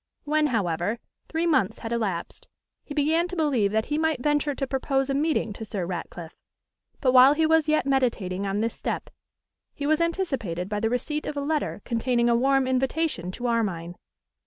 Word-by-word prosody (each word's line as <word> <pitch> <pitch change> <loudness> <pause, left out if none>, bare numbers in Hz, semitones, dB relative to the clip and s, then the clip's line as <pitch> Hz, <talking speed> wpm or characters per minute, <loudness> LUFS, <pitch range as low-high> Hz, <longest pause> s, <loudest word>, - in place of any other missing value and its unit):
When, 305 0 +2
however, 200 - -1 0.3
three 325 +1 -1
months 300 - +2
had 225 - -6
elapsed, 205 -8 -3 0.4
he 290 - -8
began 315 +4 +2
to 365 - -6
believe 270 - +1
that 220 +1 +1
he 300 +1 -1
might 320 -4 +1
venture 295 -1 +1
to 270 - -2
propose 270 +1 0
a - - 0
meeting 285 -6 0
to 220 - -8
Sir 200 -4 -3
Ratcliffe; 170 -1 -6 0.7
but 255 - +3
while 260 +3 +7
he 320 +1 +2
was 320 -1 +3
yet 310 -2 +2
meditating 225 -8 0
on 195 +2 -1
this 230 0 -1
step, - - -4 0.6
he 285 - -4
was 310 +2 +2
anticipated 270 - -1
by 210 -1 -1
the 225 - 0
receipt 295 +5 -2
of 295 - -4
a - - 0
letter 290 -7 -2
containing 240 0 +1
a 235 - +4
warm 270 +2 +3
invitation 260 - 0
to 245 - -6
Armine. 190 -8 -1
260 Hz, 185 wpm, -26 LUFS, 210-300 Hz, 0.7 s, while